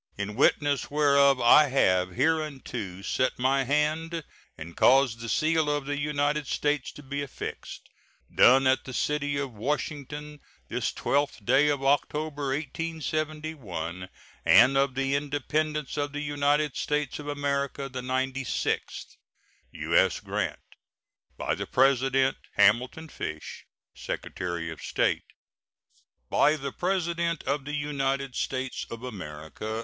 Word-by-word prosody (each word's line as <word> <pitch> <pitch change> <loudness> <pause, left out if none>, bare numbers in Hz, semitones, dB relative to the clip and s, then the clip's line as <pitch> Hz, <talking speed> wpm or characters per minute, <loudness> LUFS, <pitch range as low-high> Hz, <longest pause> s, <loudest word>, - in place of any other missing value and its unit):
In 100 +1 -3
witness 145 +3 +2
whereof 140 -2 +4
I 145 +6 +7
have 95 -9 +2
hereunto 130 - -2
set 130 +5 0
my 135 +1 +2
hand 155 +4 0 0.3
and 85 +2 -9
caused 130 -3 +4
the 115 0 -6
seal 155 +5 +2
of 145 -1 -1
the 145 0 -2
United 145 0 0
States 145 -1 -1
to 145 - -12
be 140 +1 -4
affixed. 140 -2 -7 0.5
Done 135 +2 +6
at 130 0 +2
the 130 - -7
city 145 0 0
of 140 -2 -3
Washington, 150 +4 -4 0.3
this - - -1
12th 140 -6 -1
day 135 +5 +4
of 140 -2 -1
October, 145 0 0
A.D. 145 +4 -1
1871, 155 - -4 0.3
and 135 +2 +6
of 135 -1 +2
the 135 0 0
Independence 150 +1 -1
of 145 -1 -2
the 145 - -3
United 145 0 +1
States 150 -2 -1
of 145 - -8
America 140 -1 -2
the 130 -1 -6
ninety 130 +1 -1
sixth. 105 - -3 0.5
[SEAL.] - - -11
U.S. - - +3
GRANT. - - -3 0.8
By - - -1
the - - -4
President: 135 0 +3 0.2
HAMILTON 125 +10 +3
FISH, 80 - -7 0.3
Secretary 85 -2 -4
of 80 - -9
State. - - 0 1.1
BY 150 +2 +4
THE 140 -2 -5
PRESIDENT 170 -2 -1
OF 140 0 -2
THE 150 +1 -3
UNITED 140 -2 -1
STATES 130 -1 -3
OF 115 +1 -8
AMERICA. 95 0 -6
140 Hz, 135 wpm, -27 LUFS, 130-150 Hz, 1.1 s, I